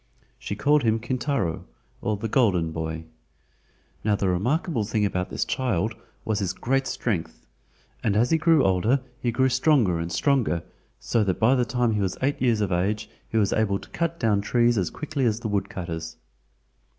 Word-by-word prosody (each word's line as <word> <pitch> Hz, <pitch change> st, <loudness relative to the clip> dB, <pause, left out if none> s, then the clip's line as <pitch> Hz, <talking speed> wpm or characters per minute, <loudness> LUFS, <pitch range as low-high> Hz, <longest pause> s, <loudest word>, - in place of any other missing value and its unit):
She 100 Hz, -, -4 dB
called 145 Hz, +7 st, +3 dB
him 110 Hz, -2 st, +2 dB
Kintaro 120 Hz, -, -2 dB, 0.4 s
or 105 Hz, -1 st, -1 dB
the 115 Hz, -, -3 dB
Golden 95 Hz, -9 st, +2 dB
Boy. 80 Hz, 0 st, -4 dB, 1.0 s
Now 105 Hz, -1 st, +2 dB
the 100 Hz, -1 st, 0 dB
remarkable 125 Hz, -, 0 dB
thing 105 Hz, 0 st, 0 dB
about 90 Hz, -2 st, -2 dB
this -, -, -2 dB
child 115 Hz, -5 st, -1 dB, 0.3 s
was 110 Hz, -2 st, 0 dB
his 95 Hz, -3 st, -1 dB
great 135 Hz, +2 st, 0 dB
strength, 80 Hz, -, -3 dB, 0.6 s
and 100 Hz, -, +1 dB
as 120 Hz, +3 st, +2 dB
he 160 Hz, -, +4 dB
grew 160 Hz, -2 st, +4 dB
older 95 Hz, +8 st, +2 dB, 0.2 s
he 120 Hz, -, 0 dB
grew 130 Hz, +3 st, +2 dB
stronger 125 Hz, -, +3 dB
and 85 Hz, +1 st, -4 dB
stronger, 95 Hz, -, +1 dB, 0.4 s
so 115 Hz, -, +1 dB
that 95 Hz, -2 st, -1 dB
by 115 Hz, +4 st, +5 dB
the 125 Hz, -2 st, +2 dB
time 120 Hz, -1 st, +1 dB
he 105 Hz, -, 0 dB
was 95 Hz, -2 st, -1 dB
eight 140 Hz, +2 st, 0 dB
years 120 Hz, -4 st, +2 dB
of 100 Hz, -2 st, 0 dB
age 105 Hz, +5 st, -1 dB, 0.2 s
he 115 Hz, -, -1 dB
was 105 Hz, -3 st, +2 dB
able 105 Hz, -3 st, +1 dB
to -, -, -13 dB
cut 170 Hz, 0 st, -2 dB
down 105 Hz, -3 st, +2 dB
trees 120 Hz, +3 st, +2 dB
as 95 Hz, -5 st, 0 dB
quickly 145 Hz, -1 st, -3 dB
as 115 Hz, 0 st, 0 dB
the 115 Hz, -, -3 dB
woodcutters. 85 Hz, -5 st, -3 dB
110 Hz, 185 wpm, -25 LUFS, 95-125 Hz, 1.0 s, by